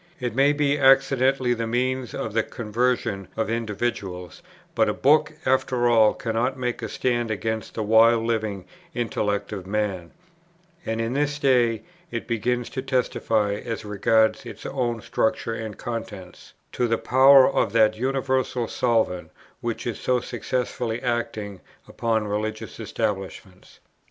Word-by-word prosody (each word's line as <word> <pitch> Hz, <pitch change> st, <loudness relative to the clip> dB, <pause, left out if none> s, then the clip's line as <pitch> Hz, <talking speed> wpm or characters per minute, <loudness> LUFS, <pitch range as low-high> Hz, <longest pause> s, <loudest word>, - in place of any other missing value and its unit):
It 125 Hz, -3 st, -3 dB
may 135 Hz, +4 st, +4 dB
be 145 Hz, 0 st, +1 dB
accidentally 135 Hz, -1 st, +4 dB
the 115 Hz, -1 st, -3 dB
means 125 Hz, +1 st, -1 dB
of 110 Hz, -, -4 dB
the 115 Hz, -, +3 dB
conversion 115 Hz, -3 st, -2 dB
of 110 Hz, 0 st, -1 dB
individuals; 105 Hz, -6 st, -3 dB, 0.3 s
but -, -, +2 dB
a -, -, -1 dB
book, 150 Hz, +2 st, +3 dB
after 130 Hz, -2 st, +2 dB
all, 110 Hz, -3 st, +5 dB
cannot 125 Hz, +1 st, -1 dB
make 125 Hz, -1 st, -3 dB
a 115 Hz, -, -4 dB
stand 120 Hz, -1 st, -1 dB
against 110 Hz, +1 st, -3 dB
the 110 Hz, -, -2 dB
wild 115 Hz, +2 st, +5 dB
living 110 Hz, -4 st, -2 dB, 0.3 s
intellect 105 Hz, -4 st, -2 dB
of 95 Hz, -3 st, -6 dB
man, 100 Hz, -4 st, -2 dB, 0.8 s
and 115 Hz, 0 st, -1 dB
in 115 Hz, +1 st, -1 dB
this 145 Hz, +1 st, 0 dB
day 125 Hz, -5 st, +2 dB, 0.3 s
it 115 Hz, -, -4 dB
begins 120 Hz, +1 st, -1 dB
to 130 Hz, -, -3 dB
testify, 115 Hz, -5 st, 0 dB
as 115 Hz, -2 st, -5 dB
regards 110 Hz, +2 st, +2 dB
its 115 Hz, -3 st, -10 dB
own 120 Hz, -4 st, -2 dB
structure 115 Hz, +1 st, -1 dB
and 110 Hz, -2 st, -6 dB
contents, 110 Hz, -6 st, -7 dB, 0.2 s
to 125 Hz, -, 0 dB
the 115 Hz, 0 st, +1 dB
power 130 Hz, +2 st, +6 dB
of 115 Hz, -6 st, +1 dB
that 110 Hz, -2 st, +4 dB
universal 130 Hz, -1 st, -1 dB
solvent, 110 Hz, -8 st, 0 dB, 0.3 s
which 115 Hz, -1 st, -4 dB
is 120 Hz, -, -3 dB
so 125 Hz, -1 st, +1 dB
successfully 120 Hz, -1 st, -3 dB
acting 110 Hz, -5 st, -3 dB, 0.3 s
upon 110 Hz, -2 st, -1 dB
religious 110 Hz, +1 st, -4 dB
establishments. 95 Hz, -2 st, -5 dB
115 Hz, 140 wpm, -24 LUFS, 110-125 Hz, 0.8 s, power